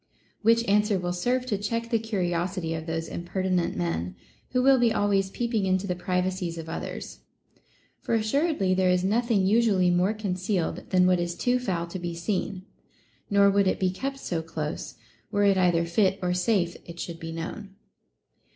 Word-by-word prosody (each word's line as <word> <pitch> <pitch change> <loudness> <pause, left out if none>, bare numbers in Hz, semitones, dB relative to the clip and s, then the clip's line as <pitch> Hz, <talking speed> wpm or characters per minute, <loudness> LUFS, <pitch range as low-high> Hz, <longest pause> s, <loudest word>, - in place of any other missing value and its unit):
Which 230 +1 +4
answer 210 0 +3
will 175 -1 -2
serve 245 +8 0
to 210 -6 -1
check 230 +3 -3
the 230 - +3
curiosity 180 -5 -2
of 160 0 -5
those 165 0 -2
impertinent 180 - -1
men 85 +1 -2 0.3
who 250 0 +1
will 270 -1 +6
be 235 -1 +4
always 200 -3 +1
peeping 225 -2 -1
into 185 +1 +1
the 180 - -1
privacies 180 -1 -2
of 165 -1 -7
others; 165 - -6 0.8
for 230 - -1
assuredly 225 - +1
there 185 0 +2
is 180 0 +2
nothing 215 0 +2
usually 200 -4 +3
more 180 +5 +2
concealed 185 -3 -2
than 185 -1 +4
what 180 -1 +3
is 175 0 -2
too 250 +4 +1
foul 180 -8 -2
to 175 +2 -6
be 175 -1 -4
seen; 185 +1 -2 0.7
nor 200 0 +5
would 200 0 +3
it - - +1
be 185 -1 +1
kept 270 +8 -4
so 170 -10 -3
close, 160 -2 -5 0.4
were 205 0 +2
it 200 -1 +5
either 175 -3 +3
fit 190 +3 +2
or 180 -1 0
safe 180 -1 +1
it 170 0 -10
should 170 -1 -5
be 165 -1 -6
known. 190 +5 -6
185 Hz, 180 wpm, -26 LUFS, 175-215 Hz, 0.8 s, will